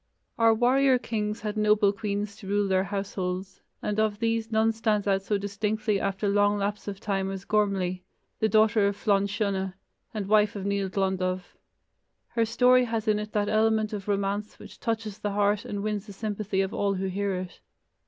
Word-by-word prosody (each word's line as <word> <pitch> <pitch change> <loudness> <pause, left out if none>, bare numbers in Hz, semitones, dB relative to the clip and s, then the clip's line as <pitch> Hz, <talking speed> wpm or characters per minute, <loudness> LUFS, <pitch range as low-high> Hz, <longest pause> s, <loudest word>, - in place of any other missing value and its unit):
Our 225 -1 +5
warrior 260 +3 +4
kings 215 -2 -3
had 210 -1 -3
noble 210 -1 +3
queens 205 0 -3
to 210 -4 -11
rule 205 0 +1
their 190 0 +2
households, 190 -1 -4 0.2
and 210 0 -1
of 215 -1 +1
these 230 0 -1
none 220 +1 +3
stands 220 -2 0
out 195 -1 +2
so 205 +1 0
distinctly 205 +1 -1
after 195 +1 -1
long 205 +1 +3
lapse 205 +1 -3
of 200 -1 -5
time 195 -2 -1
as 195 0 -6
Gormlai, 195 -4 0 0.4
the 220 - +2
daughter 215 -1 +4
of 200 - -1
Flann 200 -1 +2
Siona, 195 -2 -2 0.4
and 210 -3 -3
wife 210 0 +3
of 195 -1 -5
Nial 200 -1 0
Glondubh. 185 -1 -1 0.9
Her 230 -1 +1
story 250 +2 +4
has 225 -1 -3
in 210 -1 +3
it 210 0 -5
that 205 -1 +1
element 220 0 +2
of 200 -2 -5
romance 200 +1 -1
which - - -13
touches 225 -3 -3
the 205 -1 -2
heart 205 0 +1
and 200 -1 -4
wins 210 0 -2
the 200 - -9
sympathy 205 -1 -2
of 195 +1 -2
all 200 -1 0
who 190 +1 -2
hear 195 +1 -1
it. 180 -1 -6
205 Hz, 190 wpm, -27 LUFS, 195-215 Hz, 0.9 s, Our